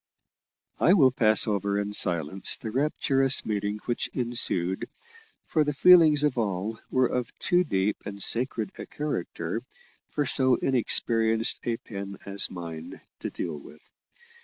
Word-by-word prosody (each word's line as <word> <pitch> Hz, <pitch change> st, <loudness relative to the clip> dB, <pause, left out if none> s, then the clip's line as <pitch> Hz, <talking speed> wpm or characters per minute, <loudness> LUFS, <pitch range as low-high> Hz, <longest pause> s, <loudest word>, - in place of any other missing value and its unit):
I 175 Hz, -, +4 dB
will 140 Hz, -9 st, +5 dB
pass 110 Hz, -3 st, +4 dB
over 100 Hz, -1 st, -1 dB
in 100 Hz, 0 st, -3 dB
silence 85 Hz, -1 st, +2 dB
the 110 Hz, -, -7 dB
rapturous 135 Hz, 0 st, +2 dB
meeting 105 Hz, -1 st, -2 dB
which 120 Hz, -, -2 dB
ensued, 115 Hz, -7 st, +1 dB, 0.6 s
for 155 Hz, -, +1 dB
the 150 Hz, -1 st, -3 dB
feelings 160 Hz, -3 st, +6 dB
of 145 Hz, -5 st, 0 dB
all 105 Hz, +1 st, -3 dB
were 130 Hz, 0 st, +2 dB
of 125 Hz, -1 st, -4 dB
too 180 Hz, 0 st, +1 dB
deep 100 Hz, -, -1 dB
and 100 Hz, 0 st, -8 dB
sacred 115 Hz, -2 st, 0 dB
a -, -, -7 dB
character 150 Hz, 0 st, -4 dB, 0.5 s
for 145 Hz, -, -2 dB
so 130 Hz, -2 st, +2 dB
inexperienced 115 Hz, -2 st, 0 dB
a 115 Hz, -1 st, -1 dB
pen 100 Hz, -3 st, -8 dB
as 100 Hz, 0 st, +2 dB
mine 85 Hz, -3 st, -8 dB, 0.2 s
to -, -, -5 dB
deal 75 Hz, -, -6 dB
with. 75 Hz, +2 st, -17 dB
115 Hz, 140 wpm, -26 LUFS, 100-135 Hz, 0.6 s, feelings